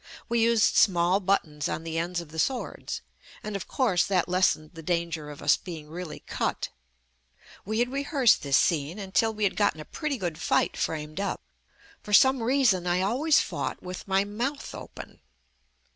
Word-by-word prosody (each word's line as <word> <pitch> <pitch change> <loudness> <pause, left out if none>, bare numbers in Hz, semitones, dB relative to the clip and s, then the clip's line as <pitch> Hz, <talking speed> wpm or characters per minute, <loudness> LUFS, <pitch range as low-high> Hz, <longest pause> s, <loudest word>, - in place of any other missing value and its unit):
We 235 0 +1
used 230 -1 +3
small 180 0 +4
buttons 175 -5 0
on 160 - -3
the 165 0 -2
ends 175 +1 -2
of 170 - -12
the 160 +1 -7
swords, 255 +8 -2 0.4
and 210 -1 -5
of 195 - -5
course 220 -11 +2
that 185 -3 +1
lessened 180 -4 +1
the 165 - -9
danger 170 -2 -2
of 145 - -10
us 145 - +5
being 160 -4 -9
really 170 0 -7
cut. - - -2 1.0
We 215 +2 -2
had 245 +2 +1
rehearsed 275 - +3
this 140 -1 +3
scene 160 +1 +1
until 205 +3 +1
we 215 -1 -4
had 200 - +2
gotten 205 -6 +1
a 155 - -7
pretty 300 - -3
good 175 -6 -4
fight - - +1
framed 155 +1 -3
up. 200 - -2 0.6
For 210 - -7
some 265 +4 +6
reason 225 -7 +2
I 175 +1 +2
always 275 +10 +3
fought - - -4
with 180 +1 -7
my 195 0 +3
mouth 240 +8 -4
open. - - -10
190 Hz, 175 wpm, -27 LUFS, 165-225 Hz, 1.0 s, some